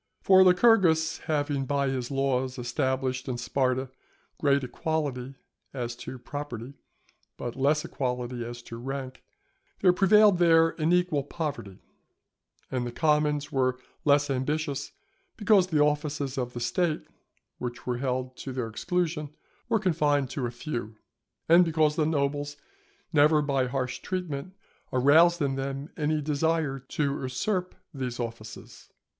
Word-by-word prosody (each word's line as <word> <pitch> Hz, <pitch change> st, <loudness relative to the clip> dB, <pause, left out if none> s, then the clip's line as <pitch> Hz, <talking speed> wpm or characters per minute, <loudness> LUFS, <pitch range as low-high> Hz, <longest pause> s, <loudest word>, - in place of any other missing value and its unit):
For 190 Hz, -1 st, +7 dB
Lycurgus 180 Hz, -5 st, +4 dB
having 145 Hz, -3 st, -1 dB
by 140 Hz, 0 st, +1 dB
his 130 Hz, -2 st, -3 dB
laws 135 Hz, -1 st, 0 dB
established 130 Hz, +2 st, -1 dB
in 125 Hz, -, -2 dB
Sparta 130 Hz, +1 st, -1 dB, 0.5 s
great 140 Hz, -2 st, +2 dB
equality 135 Hz, -2 st, -3 dB, 0.4 s
as 120 Hz, -2 st, -3 dB
to 130 Hz, -, -7 dB
property, 130 Hz, -1 st, -7 dB, 0.6 s
but 120 Hz, -, -5 dB
less 145 Hz, +3 st, +1 dB
equality 125 Hz, -2 st, -3 dB
as 120 Hz, 0 st, -8 dB
to 115 Hz, -, -8 dB
rank, 130 Hz, +1 st, -6 dB, 0.6 s
there 180 Hz, -2 st, +5 dB
prevailed 200 Hz, 0 st, +5 dB
there 165 Hz, -1 st, +5 dB
an 155 Hz, +2 st, +2 dB
equal 180 Hz, -5 st, +2 dB
poverty; 145 Hz, -, -5 dB, 0.9 s
and 125 Hz, -2 st, -1 dB
the -, -, -5 dB
commons 150 Hz, 0 st, +1 dB
were 130 Hz, -1 st, +1 dB, 0.3 s
less 145 Hz, 0 st, +3 dB
ambitious, 140 Hz, +1 st, -2 dB, 0.5 s
because 205 Hz, -4 st, +4 dB
the 155 Hz, -5 st, +2 dB
offices 150 Hz, -2 st, -1 dB
of 125 Hz, -2 st, -3 dB
the 120 Hz, -, -5 dB
State, 155 Hz, +6 st, 0 dB, 0.6 s
which 120 Hz, -1 st, -6 dB
were 125 Hz, -1 st, -1 dB
held 130 Hz, -1 st, -2 dB
to 135 Hz, -, -6 dB
their 125 Hz, -3 st, -2 dB
exclusion, 160 Hz, -, -2 dB, 0.4 s
were 230 Hz, -, +3 dB
confined 150 Hz, -, +1 dB
to 125 Hz, -3 st, -2 dB
a -, -, -5 dB
few; 120 Hz, -4 st, -5 dB, 0.5 s
and 170 Hz, +2 st, +7 dB
because 155 Hz, -2 st, +2 dB
the 155 Hz, -1 st, +1 dB
nobles 145 Hz, -1 st, -1 dB, 0.6 s
never 150 Hz, +1 st, +5 dB
by 135 Hz, -3 st, +1 dB
harsh 125 Hz, 0 st, -3 dB
treatment 180 Hz, -1 st, -4 dB, 0.4 s
aroused 160 Hz, +7 st, +5 dB
in 135 Hz, -1 st, 0 dB
them 135 Hz, +2 st, -4 dB
any 155 Hz, -1 st, 0 dB
desire 150 Hz, -1 st, 0 dB
to 140 Hz, +2 st, -2 dB
usurp 180 Hz, +9 st, -2 dB, 0.2 s
these 130 Hz, -3 st, -4 dB
offices. 115 Hz, -2 st, -8 dB
140 Hz, 135 wpm, -27 LUFS, 130-160 Hz, 0.9 s, For